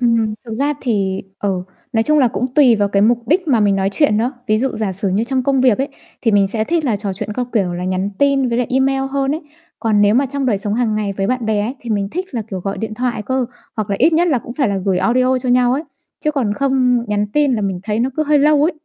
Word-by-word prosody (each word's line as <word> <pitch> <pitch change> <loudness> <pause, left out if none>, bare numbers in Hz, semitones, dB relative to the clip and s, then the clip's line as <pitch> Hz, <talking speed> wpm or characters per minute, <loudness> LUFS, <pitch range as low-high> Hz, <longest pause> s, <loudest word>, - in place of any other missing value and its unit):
Ừm, 230 -3 +2
thực 225 -2 -6
ra 280 +5 0
thì, 195 -6 -1 0.2
ờ, 200 - -1 0.4
nói 225 - +2
chung 305 +5 +2
là 260 -4 +4
cũng 245 - -2
tùy 255 -6 +6
vào 205 -1 +1
cái 200 0 +2
mục 235 +2 +2
đích 350 +1 +2
mà 240 -6 +3
mình 200 -1 +3
nói 195 0 +1
chuyện 245 -2 +2
nữa. 240 +4 0
Ví 215 -1 +2
dụ 265 +4 +1
giả 215 -3 -1
sử 195 +2 -2
như 195 +4 0
trong 260 +1 -1
công 270 0 +1
việc 250 -5 +4
ấy, 270 +2 -1 0.3
thì 230 - +3
mình 200 -2 +4
sẽ 215 +2 -2
thích 325 +4 0
là 235 -6 +1
trò 200 -1 -4
chuyện 195 +2 -5
qua, 250 +3 -2
kiểu 195 -6 +1
là, 175 +1 -4
nhắn 185 +2 -1
tin 275 -2 +2
với 235 0 0
lại 250 - 0
email 270 +1 +2
hơn 275 +1 0
ấy. 315 - -5 0.4
Còn 220 -3 +1
nếu 205 +1 +4
mà 270 +3 +3
trong 275 0 -3
đời 215 -6 +1
sống 205 +1 -2
hằng 230 -2 0
ngày 210 -2 -1
với 195 0 -2
bạn 250 -1 -1
bè 215 -1 +1
ấy 225 +5 -2
thì 235 - -7
mình 200 -2 0
thích 365 +7 -3
là, 235 -5 -3
kiểu, 190 -2 -4
gọi 195 +2 -4
điện 220 -1 -4
thoại 245 -1 -2
cơ, 260 +3 -1 0.3
hoặc 215 -2 -3
là 200 - 0
ít 330 - +4
nhất 340 +2 +3
là 275 -6 +2
cũng 235 - -9
phải 270 -5 +1
là 200 - -1
gửi 190 -2 +1
audio 255 +6 +2
cho 250 - -4
nhau 245 0 +3
ấy, 275 +4 -1 0.4
chứ 305 - +3
còn 260 -8 -1
không 255 -2 +1
nhắn 210 0 0
tin 290 -2 +2
là 220 - -1
mình 195 -3 -2
thấy 210 +1 -1
nó 255 +3 0
cứ 310 - +2
hơi 300 0 +3
lâu 295 0 +4
ấy. 325 +4 +2
235 Hz, 295 wpm, -18 LUFS, 205-270 Hz, 0.4 s, tùy